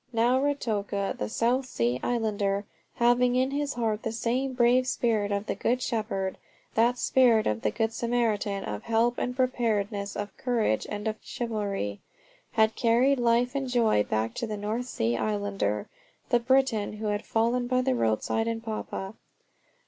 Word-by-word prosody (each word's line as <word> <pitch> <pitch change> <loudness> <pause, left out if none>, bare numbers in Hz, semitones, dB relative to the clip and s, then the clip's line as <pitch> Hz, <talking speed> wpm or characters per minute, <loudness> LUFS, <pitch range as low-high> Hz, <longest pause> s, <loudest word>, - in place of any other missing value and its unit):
Now 240 +2 +3
Ruatoka, 210 -8 -1
the 105 - -4
South 250 - +1
Sea 120 - 0
islander, 205 -4 0 0.3
having 245 +1 +3
in 260 +1 +2
his 285 -1 -2
heart 220 -3 -1
the 225 - -3
same 245 +4 -1
brave 250 +1 +3
spirit 220 -5 0
of 200 +1 -1
the - - -1
Good 250 +2 0
Shepherd 215 -6 -2 0.3
that 235 +2 +3
spirit 240 -4 +4
of 105 +1 0
the - - +1
Good 225 +1 -1
Samaritan, 220 -5 0
of 105 -1 -4
help 230 +2 +1
and 250 - -2
preparedness, 215 -6 0
of 205 -1 -5
courage 230 - 0
and 210 +1 -4
of 220 0 -2
chivalry, 200 - -3 0.5
had 220 0 +3
carried 245 +4 +3
life 240 +1 +2
and 270 -2 -2
joy 230 - +3
back 110 +2 -1
to 235 - -2
the 215 -1 -4
North 220 +4 -3
Sea 115 - -1
islander, 200 - -1 0.4
the 240 - +4
Briton 250 -4 +2
who 215 +1 -6
had 205 0 -1
fallen 235 +2 +1
by 255 0 +2
the 260 0 +2
roadside 170 - 0
in 230 0 -1
Papua. 215 -3 -5
225 Hz, 165 wpm, -27 LUFS, 205-245 Hz, 0.5 s, spirit